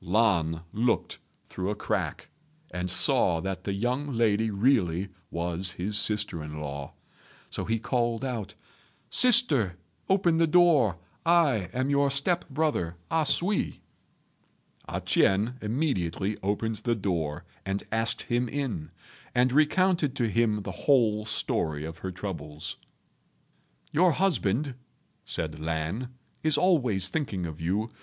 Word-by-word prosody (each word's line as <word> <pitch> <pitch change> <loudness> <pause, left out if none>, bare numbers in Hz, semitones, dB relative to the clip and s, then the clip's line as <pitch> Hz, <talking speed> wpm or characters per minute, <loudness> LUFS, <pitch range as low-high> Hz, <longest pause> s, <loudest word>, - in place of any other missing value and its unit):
Lan 85 -5 +2
looked 115 +2 0 0.3
through 95 +1 -4
a 105 - -1
crack, - - -3 0.4
and 90 0 -3
saw 95 - +3
that 95 +2 -4
the 100 - -1
young 125 +7 -1
lady 110 -1 +2
really 100 -5 +1 0.2
was 85 +1 -2
his 100 +4 -3
sister 105 -7 +1
in 75 0 -7
law; 70 -2 -6 0.6
so - - -4
he 115 +1 0
called 120 +1 -1
out, 120 -6 -4 0.6
"Sister, 150 - +6 0.3
open 180 -4 +3
the 165 0 +3
door. 155 - +4 0.3
I 155 - +3
am 130 +5 -1
your 140 0 +3
step 145 +6 0
brother 140 - -1 0.2
A 160 -2 +2
sui." 195 +8 0 1.1
A - - -3
ch'ien 105 +6 +2
immediately 105 - -1
opened 105 +3 -1
the 120 +1 -1
door 85 -8 -2 0.2
and 95 +1 -3
asked 115 0 +1
him 120 0 -1
in, 130 - -3 0.5
and 125 +1 +3
recounted 155 -1 +2
to 120 -5 0
him 105 -1 +1
the 100 - -5
whole 110 -1 +2
story 80 -8 -1
of 80 +1 -8
her 95 - -4
troubles. 80 -6 -6 1.1
"Your 170 +2 +4
husband," 140 - +1 0.5
said 80 -2 -1
Lan, 80 +9 -3 0.3
"is 155 -2 +2
always 125 - +3
thinking 100 - -2
of 80 -1 -7
you. 100 +7 -1
110 Hz, 130 wpm, -27 LUFS, 90-140 Hz, 1.1 s, Sister